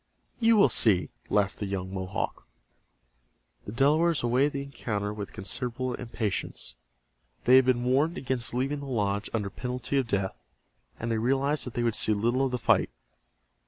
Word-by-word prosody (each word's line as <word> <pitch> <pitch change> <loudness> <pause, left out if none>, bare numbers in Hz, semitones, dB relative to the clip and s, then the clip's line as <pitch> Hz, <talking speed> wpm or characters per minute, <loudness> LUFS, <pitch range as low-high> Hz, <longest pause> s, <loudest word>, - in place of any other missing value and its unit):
"You 230 -1 +5
will 200 - +7
see," 95 -5 +3 0.2
laughed 100 -2 +1
the 105 - -3
young 95 -1 -4
Mohawk. 95 -1 -4 1.2
The - - -6
Delawares 150 +6 +3
awaited 130 +5 +2
the 140 0 -3
encounter 105 -6 -3
with 105 -2 -6
considerable 125 +5 -3
impatience. 115 - -3 0.7
They 130 +1 +7
had 130 - +5
been 125 -1 +2
warned 140 +8 +2
against 125 -3 -2
leaving 135 +3 -1
the 140 - -7
lodge 105 -5 -1
under 105 -4 -2
penalty 125 +4 -3
of 130 - -1
death, 100 -3 -1 0.7
and 115 +1 -3
they 110 - 0
realized 135 +5 +1
that 125 - -8
they 120 - 0
would 115 -1 +1
see 110 - +3
little 120 +6 +1
of 135 - 0
the 125 - -1
fight. 120 - +2
120 Hz, 165 wpm, -28 LUFS, 105-135 Hz, 1.2 s, will